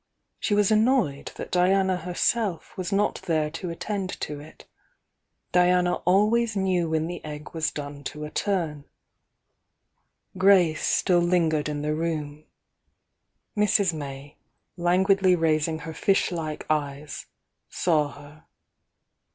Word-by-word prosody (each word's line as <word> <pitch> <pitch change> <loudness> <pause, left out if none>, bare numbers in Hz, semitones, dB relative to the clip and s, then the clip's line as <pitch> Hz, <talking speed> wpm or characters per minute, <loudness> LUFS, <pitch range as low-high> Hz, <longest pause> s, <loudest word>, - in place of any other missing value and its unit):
She 205 - 0
was 205 0 +3
annoyed 215 - +2
that - - -7
Diana 190 +1 +3
herself 180 +2 -1
was 185 +1 -4
not 205 +1 +1
there 155 -2 +1
to 170 +2 -5
attend 190 +2 -4
to 150 -1 -4
it. 155 +2 -14 0.9
Diana 180 0 +3
always 215 +4 +3
knew 185 -4 +1
when 160 0 0
the 175 +1 -6
egg 150 0 -8
was 160 -1 0
done 145 -1 -7
to 150 +3 -5
a 150 - -8
turn. 165 -8 -2 1.5
Grace 185 -5 +4
still 180 -2 +3
lingered 165 -4 +1
in 145 -1 -3
the 150 0 0
room. 155 -2 -3 1.1
Mrs. 205 -3 +3
May, 140 -1 -8 0.4
languidly 185 +2 +3
raising 160 -1 +1
her 160 - -6
fish 195 +5 +1
like 155 -3 -4
eyes, 145 -1 -3 0.4
saw 160 -5 +1
her. 145 +2 -15
170 Hz, 125 wpm, -25 LUFS, 150-190 Hz, 1.5 s, Grace